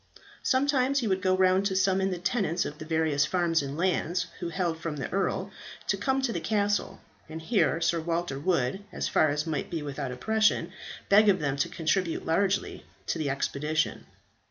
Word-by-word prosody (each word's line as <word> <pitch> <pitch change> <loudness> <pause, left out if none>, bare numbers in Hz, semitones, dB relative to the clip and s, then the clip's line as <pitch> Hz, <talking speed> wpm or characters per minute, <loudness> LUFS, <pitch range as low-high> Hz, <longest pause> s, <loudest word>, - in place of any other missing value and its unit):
Sometimes 270 0 +2
he 230 - -1
would 190 -1 0
go 185 -1 +2
round 185 +1 +3
to 190 - -2
summon 190 0 +2
the 180 - -2
tenants 180 -2 0
of 150 - -6
the 155 - -7
various 160 -3 +1
farms 170 0 +1
and 140 +1 -5
lands, 180 0 0
who 175 - -3
held 170 -2 -2
from 165 -2 -4
the 140 - -4
earl, 195 - -1 0.4
to - - +3
come 265 0 0
to 240 -3 0
the - - -2
castle; 205 -1 -1 0.3
and 160 +1 -6
here 165 0 +1
Sir 170 0 +1
Walter 165 -4 -2
would, 170 +2 0
as - - -2
far 155 - +3
as 150 +2 -1
might 155 -4 -3
be 165 -3 -3
without 135 -2 -4
oppression, 210 - +1 0.4
beg 210 +1 +6
of 190 - +4
them 140 -5 -1
to 140 - 0
contribute 170 +1 -1
largely 190 +4 0 0.2
to 165 - -2
the 150 -3 -1
expedition. 150 +3 -1
175 Hz, 190 wpm, -28 LUFS, 155-195 Hz, 0.4 s, beg